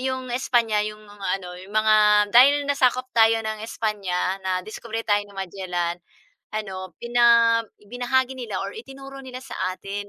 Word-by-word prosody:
'yong 260 0 -3
Espanya 235 -4 +1
'yong 215 0 -6
mga 205 -1 -9
ano, 180 -1 -9
'yong 190 +2 -13
mga 215 0 +4 0.4
dahil 280 +4 +7
nasakop 255 -2 +2
tayo 225 0 +5
ng 215 -1 -4
Espanya, 195 -4 -2
nadiskubre 215 +5 -4
tayo 205 0 +3
ni 205 - -17
Magellan 180 -2 -3 0.6
ano, 190 -3 -5
bina 235 -1 +4 0.2
ibinahagi 245 +4 -1
nila 230 -5 -4
or 195 0 -5
itinuro 270 +3 -10
nila 255 -1 -7
sa 270 - -9 0.2
atin 200 +2 -6
220 Hz, 150 wpm, -23 LUFS, 200-245 Hz, 0.6 s, dahil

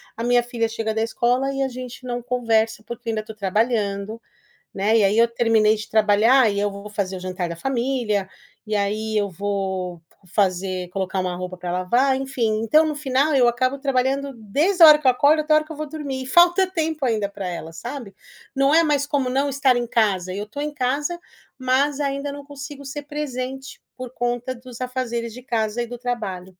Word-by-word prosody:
a 230 - -5
minha 245 0 +4
filha 235 -2 -2
chega 225 -1 -2
da 220 - -1
escola 245 +4 +1
e 275 - -2
a 270 - +2
gente 255 0 -8
não 245 0 -3
conversa 225 -3 +1
porque 235 -1 -6
eu - - +2
ainda 220 - -1
estou 215 0 -11
trabalhando, 210 +1 -1 0.5
né, 210 +3 +2
e - - +4
aí 200 +3 +3
eu 230 +1 +6
terminei 225 -2 +3
de 215 - -7
trabalhar 220 +3 +4
e 200 - -1
eu 205 0 0
vou 200 +1 -9
fazer 195 -2 -2
o - - -7
jantar 185 -1 -3
da 170 - -6
família. 240 -4 -1 0.4
E 215 -1 -1
aí 215 +2 -1
eu 205 -2 +1
vou 190 -2 -3 0.3
fazer 185 -1 0
colocar 190 0 -2
uma 180 -1 -2
roupa 180 0 -6
para 175 0 -5
lavar, 240 +10 +2
enfim, 230 -5 -1
então 305 +8 +4
no 305 - -1
final 285 +1 +1
eu 245 -3 +5
acabo 255 +3 0
trabalhando 275 0 0
desde 305 - +1
a - - +13
hora 300 -1 +9
que 290 - -5
eu - - +8
acordo 290 +5 +4
até 305 0 +2
hora 305 0 +4
que 320 - -9
eu 310 - -9
vou 305 0 -4
dormir. 285 -4 -5
E 260 - -7
falta 350 +6 +5
tempo 315 -4 -2
ainda 215 -4 0
para 200 -2 -5
ela, 165 -2 -6
sabe. 200 - -7 0.4
Não 275 +2 +3
é 335 - +6
mais 285 -2 +1
como 275 -4 0
não 275 +2 +1
estar 275 -2 +3
em 240 0 -1
casa, 190 -6 +1
eu 205 - -3
estou 220 +7 -8
em 300 - -3
casa, 290 +5 -1 0.4
mas 270 +3 +1
ainda 280 0 -2
não 285 0 -8
consigo 285 0 -9
ser 290 +2 -6
presente 270 -3 -5 0.2
por 255 -2 -7
conta 245 +1 -2
dos 245 0 -12
afazeres 240 -2 -3
de 250 +2 -10
casa 230 -2 -1
e - - -4
do 245 +1 -7
trabalho. 215 -7 -4
240 Hz, 210 wpm, -22 LUFS, 210-275 Hz, 0.5 s, a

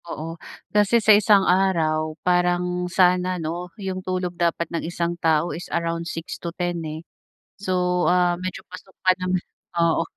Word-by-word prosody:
Oo, 165 +1 -5 0.4
kasi 210 +2 +4
sa 220 -1 +6
isang 205 -1 +5
araw 160 -4 +1
parang 180 0 +1
sana 180 0 +3
'no, 170 +2 -4
yung 190 -2 -4
tulog 185 -1 -2
dapat 170 -1 0
ng 165 - -1
isang 170 0 -2
tao 160 +1 +2
is 175 - -7
around 170 0 -2
6 165 +1 -6
to 170 - -3
10 175 -2 -2
eh. 160 +1 -6 0.5
So, 180 -2 0
ah, 175 -1 +3
medyo 185 0 -5
pasok 185 +1 -12
pa 185 - +6
naman, 185 -1 -1 0.3
oo. 170 -1 +2
180 Hz, 160 wpm, -23 LUFS, 170-185 Hz, 0.5 s, sa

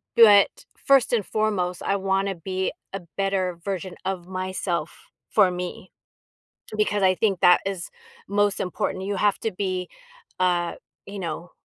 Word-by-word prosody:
But 205 -4 +8 0.3
first 270 -3 +3
and 220 -5 +2
foremost, 200 -5 -1
I 200 - +1
wanna 195 0 0
be 185 +2 -2 0.2
a 195 - -5 0.2
better 195 -2 0
version 185 -2 -4
of 185 -2 -3
myself, 185 -3 -4 0.2
for 200 -4 +4
me, 180 +1 -6 0.8
because 210 -1 +1
I 185 0 +4
think 195 -2 +1
that 180 0 +6
is 190 -3 -3 0.4
most 205 0 +1
important. 185 +1 -2
You 200 +1 -2
have 205 0 +2
to 225 - -2
be, 185 -1 -2 0.5
uh, 175 -2 +1 0.3
you 200 0 -7
know 175 0 -5
190 Hz, 145 wpm, -24 LUFS, 180-200 Hz, 0.8 s, But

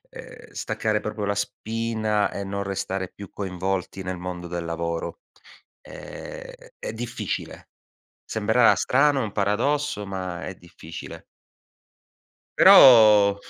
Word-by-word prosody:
ehm, - - -12
staccare 110 -1 -2
proprio 105 -1 -4
la 100 0 -1
spina 110 0 -1
e 100 - -4
non 100 0 -4
restare 95 -1 -3
più 100 -2 -12
coinvolti 95 0 -4
nel 95 0 -4
mondo 90 -1 -6
del 85 0 -4
lavoro. 85 - -4 0.6
È - - -10
è - - -6
difficile. 115 +1 -5 0.6
Sembrerà 110 +2 +3
strano 140 +1 +2
un 105 - -4
paradosso, 110 +5 0
ma 95 -2 -5
è 90 - -6
difficile. 85 -2 -11 1.4
Però 105 -5 +8
100 Hz, 110 wpm, -24 LUFS, 95-115 Hz, 1.4 s, Però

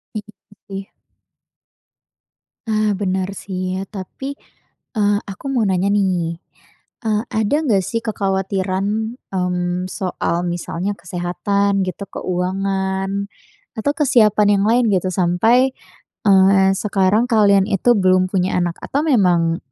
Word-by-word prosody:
Iya 210 - -2 0.5
sih. 195 0 -7 1.8
Ah 215 -1 +2
benar 190 -1 -2
sih 185 -1 -4
ya, 195 - -8
tapi, 265 +8 -7 0.6
eee, 205 -1 +3 0.2
aku 190 - -12
mau 230 -4 +2
nanya 190 0 +1
nih. 175 -4 0 0.7
Eee, 215 -1 +1
ada 220 +5 +1
nggak 200 -7 +3
sih 230 - -1
kekhawatiran, 195 +2 -1 0.2
mmm, 180 0 -1
soal 180 -3 -2 0.2
misalnya 175 +3 -3
kesehatan 195 +3 -1
gitu, 185 - -5
keuangan 190 +2 -2 0.5
atau 255 +6 +1
kesiapan 215 -7 +4
yang 200 - +1
lain 245 +2 +4
gitu, 185 0 +1
sampai, 225 +10 +3 0.5
eee, 195 -1 +5
sekarang 200 +2 +2
kalian 200 -4 +4
itu 220 +4 +3
belum 185 -1 +3
punya 185 -1 0
anak 175 -1 -1
atau 285 - -1
memang 175 - +3
195 Hz, 115 wpm, -19 LUFS, 185-210 Hz, 1.8 s, eee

